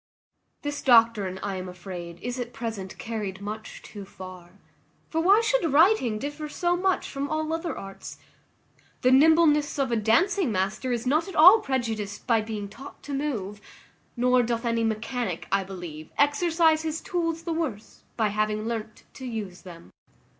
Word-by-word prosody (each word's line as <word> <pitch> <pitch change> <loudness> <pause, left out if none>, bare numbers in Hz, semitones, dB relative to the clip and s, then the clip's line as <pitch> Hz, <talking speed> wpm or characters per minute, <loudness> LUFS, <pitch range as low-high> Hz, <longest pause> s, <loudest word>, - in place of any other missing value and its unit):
This 290 0 -3
doctrine, 225 -6 +4
I 195 -2 -2
am 185 0 -6
afraid, 175 -2 -8
is 245 +1 -3
at 245 0 -5
present 220 -5 -5
carried 210 -4 -4
much 215 +2 -7
too 205 -2 -9
far: 185 -2 -11 0.6
for 325 - +1
why 395 +6 +5
should 455 - +1
writing 295 - +4
differ 295 +5 -5
so 350 +3 0
much 370 +1 0
from 280 +1 -4
all 310 0 -1
other 330 0 -3
arts? 195 0 -9 0.9
The 255 - +5
nimbleness 300 +1 +5
of 270 -3 0
a - - +2
dancing 300 - +2
master 195 +6 -1
is 240 0 -2
not 305 +7 +2
at 385 - -8
all 365 +8 +9
prejudiced 225 - -3
by 230 -3 +3
being 215 -2 -5
taught 270 +8 -12
to 290 - -6
move; 220 -9 -3 0.6
nor 250 +1 +4
doth 235 0 -2
any 230 -1 +1
mechanic, 225 -3 -2
I 195 0 +2
believe, 175 -5 -8
exercise 320 +2 +3
his 320 0 -3
tools 330 -2 -2
the 335 -1 -2
worse 280 -11 -4 0.2
by 220 -2 +2
having 215 +1 -1
learnt 225 -1 -5
to 260 - -9
use 210 -6 -5
them. 170 -2 -12
235 Hz, 165 wpm, -26 LUFS, 205-310 Hz, 0.9 s, all